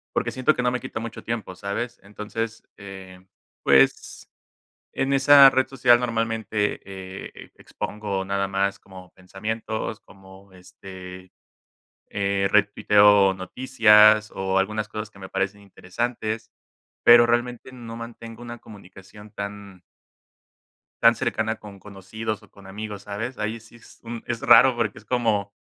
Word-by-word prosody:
porque -, -, 0 dB
siento 130 Hz, +4 st, +1 dB
que 125 Hz, -, -2 dB
no 125 Hz, -, +2 dB
me 125 Hz, -, -2 dB
quita -, -, -6 dB
mucho 115 Hz, -1 st, -8 dB
tiempo, 110 Hz, -5 st, -5 dB
¿sabes? 110 Hz, +5 st, -5 dB
Entonces, 105 Hz, +2 st, -6 dB
eh, 95 Hz, -2 st, -11 dB, 0.4 s
pues, 65 Hz, -1 st, +2 dB, 0.6 s
en 135 Hz, +1 st, -1 dB
esa 140 Hz, 0 st, +8 dB
red 130 Hz, 0 st, +1 dB
social, 120 Hz, -2 st, +4 dB
normalmente, 115 Hz, -3 st, -2 dB
eh, 95 Hz, 0 st, -10 dB
expongo 100 Hz, -2 st, -5 dB
nada 100 Hz, 0 st, -2 dB
más, 100 Hz, 0 st, -1 dB
como 95 Hz, -1 st, -14 dB
pensamientos, 110 Hz, +3 st, -5 dB
como 95 Hz, 0 st, -18 dB
este, 90 Hz, 0 st, -12 dB, 0.8 s
eh, 100 Hz, -1 st, 0 dB
retuiteo 105 Hz, -1 st, +4 dB
noticias, 105 Hz, +1 st, +4 dB
o 95 Hz, 0 st, -1 dB
algunas 105 Hz, +2 st, -1 dB
cosas 105 Hz, 0 st, -6 dB
que 100 Hz, -, -19 dB
me 95 Hz, -1 st, -9 dB
parecen 100 Hz, +1 st, -3 dB
interesantes, 110 Hz, +3 st, -5 dB, 0.5 s
pero 120 Hz, 0 st, +8 dB
realmente 120 Hz, +2 st, -2 dB
no 115 Hz, -2 st, -9 dB
mantengo 115 Hz, 0 st, -10 dB
una 120 Hz, -1 st, -8 dB
comunicación 100 Hz, +1 st, -15 dB
tan 100 Hz, -2 st, -8 dB, 1.2 s
Tan 115 Hz, 0 st, +7 dB
cercana 110 Hz, 0 st, -2 dB
con 100 Hz, -2 st, -12 dB
conocidos 105 Hz, +2 st, -6 dB
o -, -, -20 dB
con 100 Hz, -1 st, -16 dB
amigos, 105 Hz, +1 st, -7 dB
¿sabes? 115 Hz, +5 st, -5 dB
Ahí 110 Hz, +2 st, -4 dB
sí 115 Hz, +1 st, -17 dB
es 115 Hz, -, -19 dB
un 115 Hz, 0 st, -7 dB
es 120 Hz, -1 st, -3 dB
raro 130 Hz, -2 st, +6 dB
porque 115 Hz, -4 st, -2 dB
es 110 Hz, -, -14 dB
como 105 Hz, -4 st, -1 dB
105 Hz, 140 wpm, -23 LUFS, 95-115 Hz, 1.2 s, esa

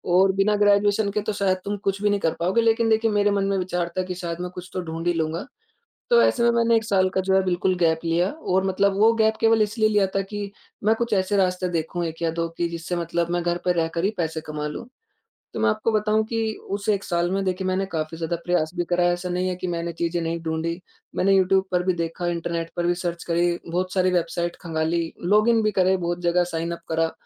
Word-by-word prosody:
और 190 Hz, +1 st, +5 dB
बिना 200 Hz, +2 st, +2 dB
ग्रेजुएशन 205 Hz, 0 st, +3 dB
के 210 Hz, +1 st, -1 dB
तो 215 Hz, +1 st, -3 dB
शायद 195 Hz, -2 st, +1 dB
तुम 205 Hz, +1 st, -2 dB
कुछ 195 Hz, 0 st, -2 dB
भी 210 Hz, -, +3 dB
नहीं 205 Hz, -, +1 dB
कर 165 Hz, -, +1 dB
पाओगे 185 Hz, +7 st, +2 dB
लेक़िन 225 Hz, 0 st, +2 dB
देखिए 220 Hz, 0 st, +2 dB
मेरे 205 Hz, 0 st, +2 dB
मन 200 Hz, -1 st, +1 dB
में 195 Hz, 0 st, 0 dB
विचार 180 Hz, -2 st, -2 dB
था 185 Hz, -, +1 dB
कि 180 Hz, 0 st, -5 dB
शायद 170 Hz, -1 st, -5 dB
मैं 180 Hz, -, -3 dB
कुछ 180 Hz, 0 st, -8 dB
तो 185 Hz, -, -2 dB
ढूँढ़ 165 Hz, 0 st, -5 dB
ही 175 Hz, -, +3 dB
लूँगा। 165 Hz, +2 st, -2 dB, 0.7 s
तो 475 Hz, 0 st, +6 dB
ऐसे 240 Hz, -, +2 dB
में 235 Hz, -, +5 dB
मैंने 235 Hz, 0 st, +3 dB
1 225 Hz, -, 0 dB
साल 190 Hz, -3 st, +2 dB
का 190 Hz, -, 0 dB
जो 190 Hz, 0 st, +1 dB
है 190 Hz, -, +4 dB
बिल्कुल 185 Hz, 0 st, +1 dB
गैप 160 Hz, -2 st, +2 dB
लिया 170 Hz, +3 st, +1 dB
और 190 Hz, -12 st, -1 dB
मतलब 195 Hz, +1 st, +1 dB
वो 220 Hz, +2 st, +6 dB
गैप 220 Hz, -1 st, +2 dB
केवल 225 Hz, -1 st, +4 dB
इसलिए 215 Hz, +1 st, +1 dB
लिया 205 Hz, -2 st, +3 dB
था 195 Hz, -, +2 dB
कि 205 Hz, -1 st, -4 dB, 0.3 s
मैं 220 Hz, +1 st, +4 dB
कुछ 235 Hz, 0 st, -2 dB
ऐसे 190 Hz, +1 st, +1 dB
रास्ते 185 Hz, -1 st, +1 dB
देखूँ 170 Hz, +1 st, -2 dB
1 165 Hz, +1 st, -7 dB
या 165 Hz, -, +2 dB
2 165 Hz, 0 st, -2 dB
कि 170 Hz, -, 0 dB
जिससे 170 Hz, +1 st, -4 dB
मतलब 170 Hz, 0 st, -1 dB
मैं 175 Hz, 0 st, 0 dB
घर 175 Hz, 0 st, 0 dB
पर 180 Hz, -, +3 dB
रहकर 165 Hz, +1 st, -1 dB
ही 200 Hz, -, +3 dB
पैसे 160 Hz, -2 st, -2 dB
कमा 150 Hz, 0 st, -3 dB
लूँ। 150 Hz, +10 st, -7 dB, 0.7 s
तो -, -, -3 dB
मैं -, -, +3 dB
आपको 215 Hz, +1 st, -1 dB
बताऊँ 215 Hz, 0 st, +2 dB
कि 225 Hz, -1 st, -1 dB, 0.2 s
उस 200 Hz, +1 st, -3 dB
1 200 Hz, -1 st, 0 dB
साल 175 Hz, 0 st, 0 dB
में 195 Hz, 0 st, 0 dB
देखिए 185 Hz, 0 st, -2 dB
मैंने 190 Hz, +1 st, 0 dB
काफ़ी 155 Hz, 0 st, -3 dB
ज़्यादा 165 Hz, +1 st, -2 dB
प्रयास 175 Hz, -3 st, +1 dB
भी 175 Hz, -, 0 dB
करा 175 Hz, 0 st, +2 dB
ऐसा 175 Hz, +1 st, -3 dB
नहीं 180 Hz, +1 st, 0 dB
है 185 Hz, -, -1 dB
कि 185 Hz, -, -5 dB
मैंने 170 Hz, 0 st, -3 dB
चीज़ें 170 Hz, +1 st, -2 dB
नहीं 165 Hz, +1 st, -2 dB
ढूँढी। 165 Hz, +1 st, -2 dB, 0.4 s
मैंने 195 Hz, +1 st, +3 dB
यूट्यूब 190 Hz, 0 st, +3 dB
पर 180 Hz, 0 st, +2 dB
भी 185 Hz, -, +2 dB
देखा 165 Hz, +1 st, -3 dB
इंटरनेट 170 Hz, -1 st, -3 dB
पर 175 Hz, -, 0 dB
भी 175 Hz, -, +2 dB
सर्च 175 Hz, -1 st, -4 dB
करी 170 Hz, 0 st, +1 dB
बहुत 180 Hz, +2 st, -2 dB
सारी 185 Hz, -1 st, +3 dB
वेबसाइट 175 Hz, 0 st, -1 dB
खंगाली 165 Hz, 0 st, -1 dB, 0.2 s
लॉगिन 215 Hz, +4 st, +4 dB
भी 215 Hz, -, +2 dB
करे 185 Hz, +1 st, +4 dB
बहुत 175 Hz, -1 st, -3 dB
जगह 175 Hz, +1 st, +2 dB
साइन 165 Hz, +1 st, -2 dB
उप -, -, -10 dB
करा। 165 Hz, 0 st, +1 dB
180 Hz, 250 wpm, -24 LUFS, 170-200 Hz, 0.7 s, तो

